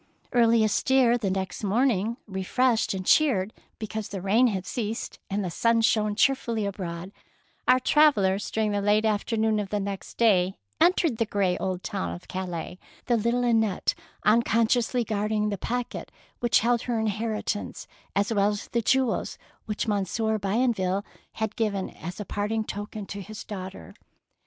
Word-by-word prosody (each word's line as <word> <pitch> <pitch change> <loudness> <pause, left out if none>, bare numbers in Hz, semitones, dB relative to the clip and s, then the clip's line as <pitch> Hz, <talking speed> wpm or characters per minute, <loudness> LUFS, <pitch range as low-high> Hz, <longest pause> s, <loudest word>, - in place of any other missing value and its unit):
Early 230 -2 +5
astir 240 +3 +3
the 220 -5 -1
next 190 +1 -3
morning, 225 +1 +1
re 190 -2 -5
freshed 235 +1 +1
and 185 -1 -5
cheered 220 -10 +3 0.2
because 215 -1 -5
the 200 - -5
rain 210 +7 +3
had 190 -5 -2
ceased 225 0 -4
and 200 0 -1
the 175 - -3
sun 230 +6 +2
shone 215 -2 +2
cheer 270 +5 +5
fully 230 -5 -3
abroad, 185 -2 -5 0.6
our 255 0 +6
travellers 210 -9 +3
during 220 -1 0
the 205 0 0
late 210 +2 +3
afternoon 220 0 +1
of 200 -2 -3
the 210 - -1
next 195 -1 -5
day 195 -5 +3 0.2
entered 340 -8 +3
the 230 - 0
grey 195 -3 +1
old 185 -1 -3
town 85 -1 -3
of 85 - -13
Calais, 180 -1 -5 0.3
the 240 - +2
little 235 +2 +1
Annette 225 -5 +2 0.3
unconsciously 230 +2 +3
guarding 210 0 0
the 200 - -2
packet 245 +3 -4 0.3
which 240 -1 +3
held 235 +1 +2
her 240 -2 -1
inheritance 215 -1 -2 0.3
as 205 +3 +1
well 200 -1 +3
as 205 -1 -4
the 235 - 0
jewels 260 +1 +1 0.3
which 210 +1 -2
Monsieur 215 +2 0
Bienville 200 -2 0 0.3
had 220 -1 -3
given 205 -4 -1
as 175 +5 -8
a 210 - -4
parting 210 +3 -1
token 205 0 -6
to 200 +1 -6
his 215 +2 -8
daughter. 190 -2 -8
215 Hz, 160 wpm, -26 LUFS, 195-230 Hz, 0.6 s, our